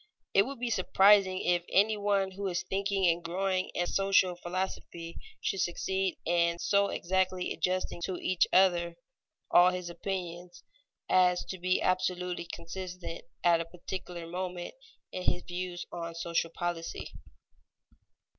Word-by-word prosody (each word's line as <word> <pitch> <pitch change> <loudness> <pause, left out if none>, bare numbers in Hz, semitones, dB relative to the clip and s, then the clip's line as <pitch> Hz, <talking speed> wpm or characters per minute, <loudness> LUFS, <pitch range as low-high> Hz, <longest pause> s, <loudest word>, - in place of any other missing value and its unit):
It 195 +4 +5
would 275 0 -6
be 245 -1 -1
surprising 190 -1 +5
if 175 -1 +2
any 215 +3 +4
one 200 -2 +1
who 195 +1 -4
is 175 -2 -1
thinking 195 +1 0
and 170 0 +2
growing 185 +2 -1
in 175 - +1
social 195 -1 +3
philosophy 175 -1 -4 0.3
should 195 - -1
succeed 190 +1 -1
in 170 0 +2
so 200 +3 +2
exactly 185 0 0
adjusting 185 -1 -1
to 185 - -3
each 185 0 +2
other 175 -2 +4 0.6
all 175 +1 +7
his 180 -1 -4
opinions, 175 -1 -5 0.4
as 180 -1 +4
to 185 - -5
be 185 +1 +1
absolutely 180 -1 0
consistent 180 0 -7 0.2
at 170 -1 +5
a - - -4
particular 175 0 -7
moment 180 +1 -4 0.4
in 185 - -4
his 180 - -6
views 175 0 -5
on 170 -1 -5
social 165 0 -1
policy. 170 -1 -4
180 Hz, 135 wpm, -30 LUFS, 175-190 Hz, 0.6 s, all